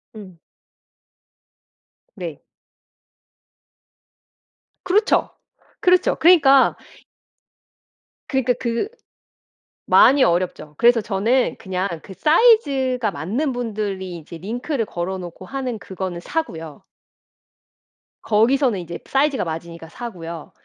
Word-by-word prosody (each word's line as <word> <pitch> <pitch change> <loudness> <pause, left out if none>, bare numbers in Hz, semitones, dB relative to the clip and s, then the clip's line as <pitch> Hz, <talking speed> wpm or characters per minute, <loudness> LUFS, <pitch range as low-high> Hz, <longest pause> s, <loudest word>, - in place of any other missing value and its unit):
응. 190 -5 -12 1.8
네. - - -7 2.4
그렇죠. 395 +4 +2 0.5
그렇죠. 365 0 +3
그러니까 290 -6 +5 1.5
그니까 260 -2 +1
그 235 - -1 1.0
많이 275 0 +6
어렵죠. 170 -3 -1
그래서 235 0 +5
저는 230 +5 0
그냥 190 -2 -3
그 195 - -11
사이즈가 275 - +3
맞는 210 - -2
분들이 205 -6 -4
이제 170 +1 -10
링크를 235 - -3
걸어 190 -1 -4
놓고 175 0 -9
하는 260 -2 -4
그거는 185 -3 -6
사고요. 170 - -5 1.4
거기서는 230 +1 +2
이제 175 -1 -7
사이즈가 275 0 +1
맞으니까 165 0 -7
사고요. 170 -7 -8
220 Hz, 210 characters per minute, -21 LUFS, 180-265 Hz, 2.4 s, 많이